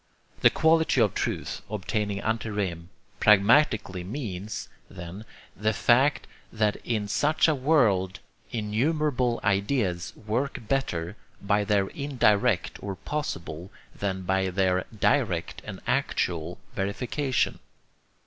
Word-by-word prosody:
The - - +7
quality 160 -3 +3
of 105 -4 +3
truth, - - -3
obtaining 105 -1 -2
ante 110 0 -1
rem, 90 -5 -3 0.3
pragmatically 105 -3 +4
means, 105 -2 -5 0.2
then, 85 +5 -9 0.3
the 110 +1 0
fact 130 +7 +3 0.3
that 105 -1 +1
in 110 -3 -2
such 150 +11 +2
a 160 - +4
world 125 - +2 0.3
innumerable 125 +3 0
ideas 100 -3 0
work 115 +2 -3
better 100 -8 -1 0.2
by 100 +1 +1
their 100 -1 +2
indirect 125 - +1
or 100 -1 -4
possible 90 - -5 0.2
than 95 -2 -3
by 95 +1 +1
their 90 0 +1
direct 110 - 0
and - - -7
actual 85 0 -1 0.2
verification. 125 +7 -1
105 Hz, 110 wpm, -27 LUFS, 95-125 Hz, 0.3 s, The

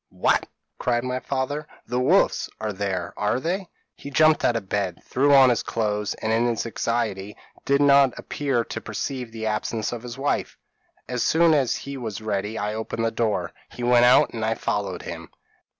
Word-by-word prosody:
p> - - -26
"'What!' - - +2 0.3
cried 120 -1 0
my 125 0 -2
father, 140 +3 -3 0.2
'the 125 - -2
wolves 160 +10 +3
are 110 -1 -3
there, 95 -2 -3
are 105 +4 0
they?' 180 +6 -2 0.3
"He 140 - -9
jumped 155 +2 +4
out 120 - +3
of 105 -4 -3
bed, 95 -3 -2
threw 140 +3 +2
on 135 -2 +7
his 120 - +1
clothes, 105 -2 -2
and, 110 - -3
in 115 +2 +2
his 120 -1 -1
anxiety, 110 -4 -2 0.3
did 140 +1 +3
not 140 -2 +5
appear 135 -5 -1
to - - -6
perceive 125 +2 -4
the 110 -1 -5
absence 110 0 -2
of 120 -2 -5
his 125 +1 -8
wife. 140 +2 -1 0.5
As 125 -1 -2
soon 165 0 +4
as 135 -5 +2
he 140 0 -6
was 110 -5 -5
ready 105 0 -3
I 105 +1 -2
opened 110 +1 -3
the 115 - +1
door; 105 -7 -1 0.2
he 120 - -8
went 120 0 +5
out, 125 - +5
and 115 -2 -4
I 110 +1 +1
followed 100 -5 -2
him. 85 -1 -7
115 Hz, 195 wpm, -24 LUFS, 105-135 Hz, 0.5 s, on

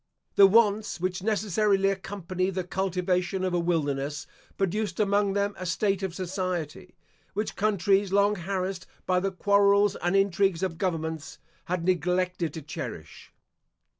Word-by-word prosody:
The 195 - +8
wants 210 -1 +3
which 185 +1 -2
necessarily 205 -1 +2
accompany 185 -1 -3
the 185 -1 -2
cultivation 180 0 -1
of 185 -1 -1
a 175 - +2
wilderness 145 -4 -1 0.3
produced 205 +3 -1
among 200 -1 +2
them 200 0 0
a 185 - -4
state 195 +2 0
of 190 -3 -3
society, 185 -2 -4 0.4
which 210 +2 -2
countries 200 -1 +2
long 200 +1 +4
harassed 190 0 -3 0.2
by 180 -1 +2
the 195 +1 -1
quarrels 200 +1 +3
and 175 +2 0
intrigues 195 -2 +2
of 165 -4 -2
governments, 160 -4 -3 0.3
had 175 -1 -2
neglected 180 -1 0
to 160 - -6
cherish. 150 - -8
190 Hz, 135 wpm, -27 LUFS, 175-200 Hz, 0.4 s, The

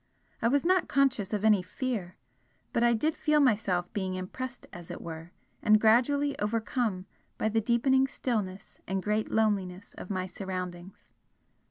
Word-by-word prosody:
I 230 - +3
was 285 +6 +2
not 370 0 +3
conscious 260 -8 +2
of 210 -1 -1
any 210 -3 +5
fear, 200 -2 -4 0.6
but 235 - +1
I 235 0 +4
did 305 +8 0
feel 300 -1 +2
myself 205 -9 +1
being 190 -3 -2
impressed 245 +8 -6
as 175 -1 -10
it - - -6
were 165 0 -8 0.3
and 215 0 +5
gradually 275 +6 +3
overcome 215 -2 -1 0.3
by 220 - 0
the 225 +1 +1
deepening 260 +4 +3
stillness 210 -8 -4
and 190 -1 -2
great 210 +1 0
loneliness 200 -4 0
of - - -8
my 185 -2 -1
surroundings. 185 -1 -7
215 Hz, 155 wpm, -29 LUFS, 185-250 Hz, 0.6 s, any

